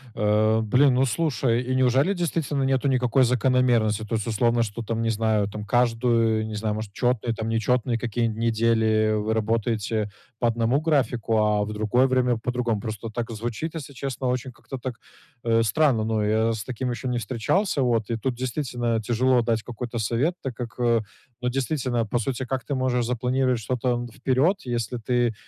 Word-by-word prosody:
Э, 110 +1 +2
блин, 130 +5 +4
ну 130 +1 +3
слушай, 125 -3 0
и 130 +1 -2
неужели 130 +8 +3
действительно 160 -5 -1
нету 135 +1 +1
никакой 130 0 +3
закономерности? 120 -3 +2
То 110 +1 -3
есть, 110 +1 -2
условно, 115 +1 +2
что, 110 +2 -5
там, 115 0 -2
не 115 - 0
знаю. 110 -2 +1
Там, 105 +1 -6
каждую, 115 -1 +2
не 110 - -5
знаю, 105 0 -1
может, 110 -2 -5
четные, 120 -2 0
там, 110 0 -4
нечетные 115 +1 +1
какие-нибудь 115 -1 -2
недели 110 -1 +2
вы 105 +1 0
работаете 110 -1 -1 0.3
по 120 - +2
одному 115 +5 +1
графику, 125 -8 +1
а 105 -1 +2
в 105 - -5
другое 110 +5 +2
время 125 -2 +2
по 125 +2 -3
другому. 120 -4 -1
Просто 110 0 -5
так 115 +1 -4
звучит, 120 +9 -4
если 140 -3 -7
честно, 130 -1 -4
очень 125 +1 -2
как-то 130 +2 -9
так, 125 -1 -5 0.5
э, 115 -1 +3
странно. 115 0 +2
Но 110 -1 0
я 110 +2 +2
с 105 -2 -4
таким 125 +1 -4
еще 125 +2 -4
не 125 -1 0
встречался, 135 - 0
вот. 115 -3 +1
И 115 - -1
тут 125 +2 -2
действительно 120 -3 -2
тяжело 125 +3 +2
дать 115 -1 0
какой-то 120 -1 -5
совет, 120 - +1
так 130 -3 -5
как, 120 0 -7
э, 115 -2 +3 0.4
ну, 125 - 0
действительно. 130 -3 -1
По 120 +3 -1
сути, 130 +2 -2
как 130 0 -3
ты 145 - -3
можешь 125 -2 0
запланировать 125 +1 0
что-то 125 +3 -2
н 120 0 -3
вперед, 135 - +1
если 120 -1 -2
ты 120 0 0
120 Hz, 185 wpm, -25 LUFS, 110-130 Hz, 0.5 s, блин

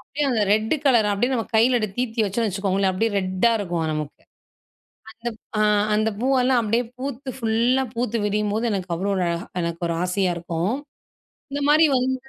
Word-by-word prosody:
அப்டியே 290 +2 -3
அந்த 225 -4 +1
red 220 +6 +2
colour, 235 -6 +4
அப்டியே 240 +6 0
நம்ம 230 -3 -2
கையில 240 +2 +4 0.2
தீர்த்தி 240 -2 -1
வச்சுக்கோங்களேன் 195 -2 0
அப்டியே 225 +4 0
ரெட்டா 185 +4 +1
இருக்கும் 175 -5 -2
நமக்கு. 150 -1 -5 0.9
அந்தப் 230 -1 -6 0.2
ஆ - - +3 0.3
அந்த 215 +1 +2
பூவெல்லாம் 255 0 +3
அப்டியே 230 +2 0
பூத்து 270 0 -5
ஃபுல்லா 235 +2 +1
பூத்து 235 -1 -1
விரியும்போது 210 +2 0
எனக்கு 190 -3 -3
அவ்வளோ 195 +4 -1
ஒரு 185 - 0
அழகா 170 0 -2 0.2
எனக்கு 170 0 -4
ஒரு 170 - -1
ஆசையா 180 0 0
இருக்கும். 170 +5 -2 0.8
இந்த 285 +1 -3
மாரி 305 +2 +6
வந்து 255 +1 +1
220 Hz, 160 wpm, -23 LUFS, 190-245 Hz, 0.9 s, மாரி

